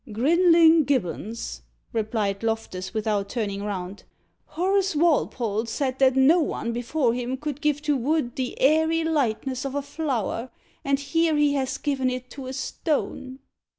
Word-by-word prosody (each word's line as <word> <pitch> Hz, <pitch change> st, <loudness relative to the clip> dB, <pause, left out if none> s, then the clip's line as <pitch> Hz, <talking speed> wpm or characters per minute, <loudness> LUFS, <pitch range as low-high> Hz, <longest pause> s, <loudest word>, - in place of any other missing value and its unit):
"Grinling 330 Hz, -, +5 dB
Gibbons," 230 Hz, -3 st, -2 dB, 0.3 s
replied 215 Hz, -3 st, -1 dB
Loftus, 220 Hz, -5 st, -3 dB
without 210 Hz, -2 st, -1 dB
turning 200 Hz, -4 st, -3 dB
round. 195 Hz, -1 st, -5 dB, 0.4 s
"Horace 380 Hz, +1 st, 0 dB
Walpole 245 Hz, -9 st, +1 dB
said 260 Hz, +2 st, -2 dB
that 265 Hz, -1 st, +4 dB
no 275 Hz, +7 st, +5 dB
one 235 Hz, -6 st, -2 dB
before 240 Hz, +1 st, 0 dB
him 250 Hz, +1 st, -3 dB
could 295 Hz, 0 st, -5 dB
give 300 Hz, -1 st, 0 dB
to 295 Hz, -1 st, +1 dB
wood 270 Hz, -1 st, 0 dB
the 255 Hz, -2 st, -4 dB
airy 320 Hz, +4 st, +3 dB
lightness 265 Hz, -4 st, -1 dB
of 275 Hz, 0 st, -4 dB
a 285 Hz, -, -1 dB
flower, 260 Hz, -6 st, -3 dB, 0.3 s
and 275 Hz, 0 st, +1 dB
here 325 Hz, +3 st, +1 dB
he 295 Hz, -1 st, +3 dB
has 265 Hz, -2 st, -1 dB
given 270 Hz, -3 st, 0 dB
it 255 Hz, 0 st, -5 dB
to 270 Hz, -2 st, -8 dB
a 260 Hz, -, -5 dB
stone." 265 Hz, -1 st, -3 dB
265 Hz, 150 wpm, -25 LUFS, 230-300 Hz, 0.4 s, Grinling